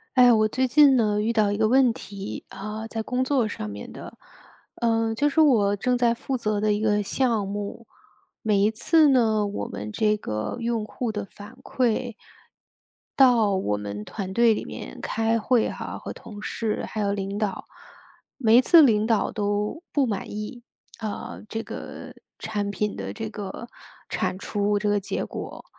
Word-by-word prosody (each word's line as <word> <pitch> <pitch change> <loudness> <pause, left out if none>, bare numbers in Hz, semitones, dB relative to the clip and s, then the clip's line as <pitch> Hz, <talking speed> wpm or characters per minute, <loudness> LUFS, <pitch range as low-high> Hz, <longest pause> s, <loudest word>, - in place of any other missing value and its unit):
哎， 245 -1 +7
我 215 -1 +4
最 260 +4 0
近 285 0 +6
呢， 210 -2 +2
遇 220 +2 +1
到 215 -3 +2
一 205 - -1
个 220 - +3
问 255 0 +4
题， 200 -2 -7
呃， 215 +2 -6
在 225 0 -4
工 250 +3 -1
作 260 -4 +1
上 105 - -5
面 100 0 -8
的。 - - -10 0.6
呃， 225 -1 +1
就 290 +5 +2
是 295 - 0
我 215 -9 +4
正 250 +5 0
在 240 -1 +3
负 260 +3 -4
责 215 -3 -1
的 210 0 +2
一 205 - -1
个 210 -1 +2
项 225 -2 0
目， 205 +3 -5 0.6
每 210 -2 +2
一 205 +2 +3
次 310 +7 +4
呢， 220 -5 +3
我 205 0 -4
们 105 +1 -6
这 210 - +1
个 110 - -4
用 230 -1 -1
户 235 +1 -3
的 215 - -4
反 205 +4 -13
馈 245 -1 0 1.1
到 235 -6 +5
我 105 - 0
们 105 0 -6
团 195 -3 -5
队 235 +2 +4
里 - - -3
面 - - -8
开 225 0 0
会 235 +1 +2
哈， - - -6
和 - - -7
同 205 -2 -11
事 215 +1 -3
还 215 - -4
有 200 -1 +1
领 200 0 -3
导， 210 -3 -3 0.7
每 230 -3 +5
一 - - +8
次 335 +6 +7
领 215 -5 +3
导 225 -3 +1
都 210 +7 -2
不 285 -2 +2
满 205 -5 -3
意， 210 +3 -6 0.4
呃， 215 -2 -6
这 225 +2 -3
个 - - -8 0.2
产 205 -2 -3
品 210 +1 -2
的 95 0 -5
这 110 - -5
个 200 - -7 0.4
产 185 - -2
出 205 +1 0
这 205 +1 -1
个 205 0 +2
结 200 - -3
果。 - - -8
215 Hz, 195 characters per minute, -25 LUFS, 205-235 Hz, 1.1 s, 一